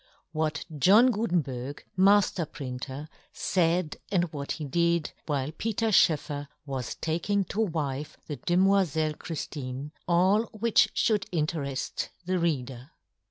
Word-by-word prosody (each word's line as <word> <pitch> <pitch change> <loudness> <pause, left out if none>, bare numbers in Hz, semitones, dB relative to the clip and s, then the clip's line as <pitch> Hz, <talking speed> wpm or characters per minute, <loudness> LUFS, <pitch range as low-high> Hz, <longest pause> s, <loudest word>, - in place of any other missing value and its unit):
What 155 0 -1
yohn 200 - +6
Gutenberg, 145 - -2
Majier 190 -3 +4
printeryfaid, 150 +5 -2
and 180 -3 +3
what 140 -1 -3
he 155 - -5
did, 170 +2 +1 0.2
while 145 -2 -1
Peter 225 +5 -1
Schoefferwas 145 - 0
taking 180 +5 0
to 205 +3 -2
wife 150 -6 -2
the 150 - -5
demoifelle 175 -1 +2
Chrijiine; 145 -3 -5 0.2
all 185 +6 +4
which 225 0 +2
Jhould 210 -2 +1
inter^eji 150 -6 -2 0.2
the 185 0 0
reader. 135 -6 -2
160 Hz, 110 wpm, -28 LUFS, 145-185 Hz, 0.2 s, yohn